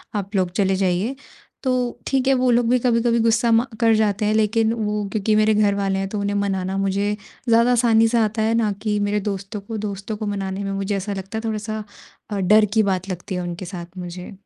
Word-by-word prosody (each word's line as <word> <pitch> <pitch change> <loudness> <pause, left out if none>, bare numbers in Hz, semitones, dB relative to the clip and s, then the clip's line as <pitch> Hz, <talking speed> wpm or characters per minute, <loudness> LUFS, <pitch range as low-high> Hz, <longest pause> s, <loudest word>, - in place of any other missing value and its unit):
आप 200 +1 -3
लोग 185 -2 +2
चले 195 0 +1
जाइए। 190 +7 0 0.5
तो 260 - +1 0.4
ठीक 265 -1 +1
है 270 - +5
वो 255 -1 +2
लोग 240 -1 +3
भी 250 - +4
कभी-कभी 235 -1 +2
गुस्सा 230 +1 +2
म 225 +1 +5 0.2
कर 225 -1 +4
जाते 210 -1 +1
हैं 215 - +2
लेकिन 220 +1 +2
वो 210 -2 -2
क्योंकि 215 0 +1
मेरे 215 0 +4
घरवाले 200 -2 +1
हैं 195 - -2
तो 210 - -3
उन्हें 200 0 -1
मनाना 195 -1 -1
मुझे 200 +1 0 0.3
ज़्यादा 230 +2 +5
आसानी 230 -2 +4
से 235 +1 +1
आता 220 0 +1
है 220 +1 +2
ना 220 -3 +2
कि 210 -1 0
मेरे 205 +1 0
दोस्तों 200 +1 -5
को, 220 +2 -6
दोस्तों 205 0 -4
को 215 - -4
मनाने 195 -1 -3
में 195 - -3
मुझे 195 +1 -2
ऐसा 200 +1 -3
लगता 195 +3 -6
है - - -2
थोड़ा-सा 215 0 -3 0.5
अ, 205 -2 -2
डर 210 +3 +5
की 220 -1 +4
बात 190 -1 -1
लगती 185 +1 -5
है 180 - -2
उनके 175 +1 -5
साथ 175 0 -8
मुझे। 180 0 -7
210 Hz, 225 wpm, -22 LUFS, 195-225 Hz, 0.5 s, है